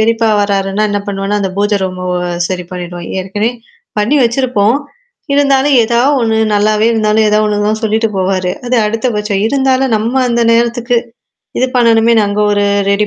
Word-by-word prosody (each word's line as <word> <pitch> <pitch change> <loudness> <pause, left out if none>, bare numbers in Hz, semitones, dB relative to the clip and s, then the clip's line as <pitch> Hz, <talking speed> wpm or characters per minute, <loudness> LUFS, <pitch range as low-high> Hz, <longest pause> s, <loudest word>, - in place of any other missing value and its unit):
பெரியப்பா 225 +1 +1
வராருன்னா 200 0 -1
என்ன 205 - -1
பண்ணுவேன்னா, 200 +1 -2
அந்த 195 - -2
பூஜை 205 +1 +1
ரூம 185 -1 -4 0.5
சரி 180 -1 -4
பண்ணிடுவோம். 175 -1 -7
ஏற்கனவே 205 +4 -2 0.5
பண்ணி 220 +8 +1
வச்சிருப்போம். 235 -2 +1 0.6
இருந்தாலும் 280 0 +3
ஏதாவது 240 +5 +2
ஒண்ணு 225 -1 0 0.2
நல்லாவே 210 +1 +2
இருந்தாலும் 215 -1 +2
ஏதாவது 210 +1 +2
ஒண்ணு 205 0 -1
தான் 215 0 -1
சொல்லிட்டு 220 +1 0
போவாரு. 185 -1 -1 0.2
அது 250 0 0
அடுத்தபட்சம். 210 -3 -2
இருந்தாலும் 265 0 +1
நம்ம 230 +5 -1
அந்த 235 0 +1
நேரத்துக்கு. 235 +1 +1 0.6
இது 255 - +2
பண்ணணுமே 230 -1 +3
அங்க 205 +1 -2
ஒரு 205 0 +1 0.3
ரெடி 205 +1 +1
215 Hz, 150 wpm, -13 LUFS, 205-235 Hz, 0.6 s, இருந்தாலும்